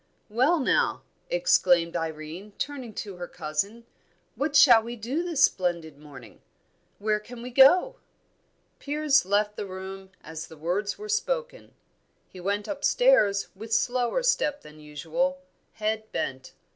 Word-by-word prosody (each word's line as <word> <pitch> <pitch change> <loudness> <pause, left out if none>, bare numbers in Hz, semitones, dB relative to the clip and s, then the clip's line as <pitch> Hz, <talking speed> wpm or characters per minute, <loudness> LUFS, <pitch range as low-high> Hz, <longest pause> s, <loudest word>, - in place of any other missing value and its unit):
"Well, 260 +10 +2
now," 265 - +1 0.3
exclaimed 180 - +3
Irene, 165 +4 -5
turning 270 -5 -5
to 200 -3 -6
her 175 0 -6
cousin, 200 +12 -4 0.5
"what 285 +1 -2
shall 245 -6 +8
we 235 +2 -7
do 240 +8 -3
this 335 -5 +1
splendid 170 - 0
morning? 145 -3 -14 0.6
Where 210 +1 0
can 235 +2 -11
we 250 - -7
go?" 355 - +5 0.8
Piers 290 -2 +2
left 210 +1 +1
the 205 - -4
room 190 0 -8
as 160 0 -7
the 160 - -14
words 180 +6 -2
were 425 - -8
spoken. - - -3 0.5
He 185 - -13
went 200 +3 -2
upstairs 295 - +3
with 220 +3 -10
slower 245 - +1
step 300 - +1
than 150 0 -14
usual, 160 - -2 0.4
head 215 0 -3
bent. 130 0 -4
215 Hz, 135 wpm, -26 LUFS, 180-285 Hz, 0.8 s, shall